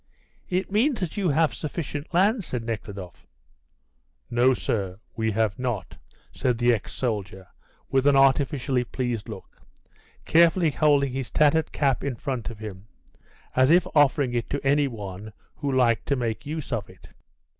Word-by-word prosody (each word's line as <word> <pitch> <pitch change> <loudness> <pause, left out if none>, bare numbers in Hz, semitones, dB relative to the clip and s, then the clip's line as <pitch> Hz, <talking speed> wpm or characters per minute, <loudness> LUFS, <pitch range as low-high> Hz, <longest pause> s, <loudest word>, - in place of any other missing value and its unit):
"It 185 +2 -1
means 240 +6 +2
that 180 -5 -3
you 195 -4 0
have 155 +2 +2
sufficient 150 0 -5
land," 200 +5 +3
said 125 -7 -4
Nekhludoff. 100 -5 -7 1.0
"No, 125 +2 +4
sir, 95 -5 -2 0.2
we 110 -1 0
have 110 -1 0
not," 120 -7 -3 0.4
said 125 -2 0
the 120 0 +3
ex 110 - -4
soldier, 100 -6 -3 0.4
with 135 +1 +2
an 145 - +5
artificially 135 -1 +3
pleased 120 -3 -3
look, - - -10 0.6
carefully 170 0 +4
holding 140 -3 +2
his 130 -2 -4
tattered 155 +1 +2
cap 135 -3 0
in 140 -3 -2
front 125 -1 -4
of 115 - -9
him, 105 -2 -9 0.7
as 130 +1 +4
if 175 +2 +5
offering 140 -3 +3
it 120 -1 -2
to 145 0 -3
any 140 +1 +3
one 105 -3 -8 0.2
who 145 -2 -2
liked 120 -4 +2
to 140 - +2
make 120 0 -3
use 155 -3 -4
of 110 -4 -3
it. 95 - -16
130 Hz, 155 wpm, -25 LUFS, 115-150 Hz, 1.0 s, an